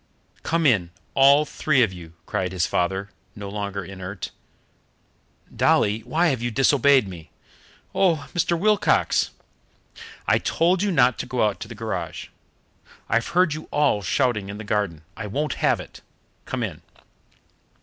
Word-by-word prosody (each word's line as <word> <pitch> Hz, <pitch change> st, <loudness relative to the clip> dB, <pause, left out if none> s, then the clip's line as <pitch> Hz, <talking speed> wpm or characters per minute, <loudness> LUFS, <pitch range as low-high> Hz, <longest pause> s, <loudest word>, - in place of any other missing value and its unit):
"Come 165 Hz, 0 st, 0 dB
in, 100 Hz, -11 st, +3 dB, 0.2 s
all 140 Hz, +2 st, +6 dB
three 140 Hz, -3 st, +2 dB
of 100 Hz, -5 st, 0 dB
you!" 85 Hz, -2 st, -11 dB
cried 90 Hz, -1 st, -2 dB
his 90 Hz, -3 st, +1 dB
father, 95 Hz, +3 st, -1 dB, 0.2 s
no 100 Hz, -1 st, -7 dB
longer 100 Hz, -2 st, -4 dB
inert. 95 Hz, 0 st, -7 dB, 1.2 s
"Dolly, 105 Hz, +1 st, +3 dB
why 165 Hz, +9 st, +1 dB
have 130 Hz, -5 st, -1 dB
you 120 Hz, -, -1 dB
disobeyed 135 Hz, 0 st, +4 dB
me?" 85 Hz, -4 st, -10 dB, 0.6 s
"Oh, 170 Hz, -6 st, +2 dB
Mr. 170 Hz, -1 st, +1 dB
Wilcox 210 Hz, +3 st, +2 dB, 0.5 s
" -, -, -17 dB
"I -, -, +4 dB
told 175 Hz, +2 st, +1 dB
you 205 Hz, -, +1 dB
not 130 Hz, -7 st, +3 dB
to -, -, -4 dB
go 125 Hz, -3 st, 0 dB
out 105 Hz, -, -3 dB
to -, -, -7 dB
the 115 Hz, -, -9 dB
garage. 100 Hz, -6 st, -5 dB, 0.8 s
I've 115 Hz, +1 st, +1 dB
heard 180 Hz, -4 st, +4 dB
you 155 Hz, +1 st, -7 dB
all 145 Hz, -8 st, +2 dB
shouting 105 Hz, 0 st, 0 dB
in 100 Hz, -, -6 dB
the 110 Hz, -, -7 dB
garden. 100 Hz, -7 st, -2 dB
I 110 Hz, -, -6 dB
won't 145 Hz, +7 st, -2 dB
have -, -, +3 dB
it. -, -, -11 dB, 0.5 s
Come 130 Hz, -2 st, -2 dB
in." 85 Hz, -7 st, -5 dB
115 Hz, 155 wpm, -23 LUFS, 100-145 Hz, 1.2 s, all